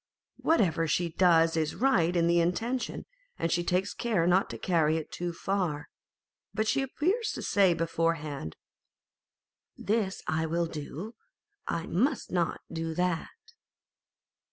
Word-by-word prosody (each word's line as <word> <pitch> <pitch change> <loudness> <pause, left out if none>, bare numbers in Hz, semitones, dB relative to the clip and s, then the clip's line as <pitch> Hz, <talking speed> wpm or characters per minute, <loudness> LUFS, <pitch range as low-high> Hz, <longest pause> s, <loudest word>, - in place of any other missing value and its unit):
Whatever 175 - +2
she 175 +2 +1
does 165 -1 +4
is 155 -2 0
right 185 -10 +2
in 170 -1 +3
the 170 0 +4
intention, 225 +9 -1 0.3
and 165 - -1
she 175 0 +1
takes 185 +3 0
care 210 -8 0
not 180 +3 +3
to - - -6
carry 160 -3 +2
it 160 - -6
too 175 0 -3
far; 170 -4 -2 0.7
but 220 0 0
she 275 - +2
appears 370 - 0
to - - -5
say 190 -4 +3
beforehand, 165 - -2 0.7
" - - -64
This 205 -3 -1
I 160 +1 0
will 170 +2 0
do, 160 - -6 0.5
I 165 - -2
must 250 - 0
not 175 -2 0
do 165 -1 -3
that." 180 -1 0
170 Hz, 140 wpm, -29 LUFS, 165-200 Hz, 0.7 s, does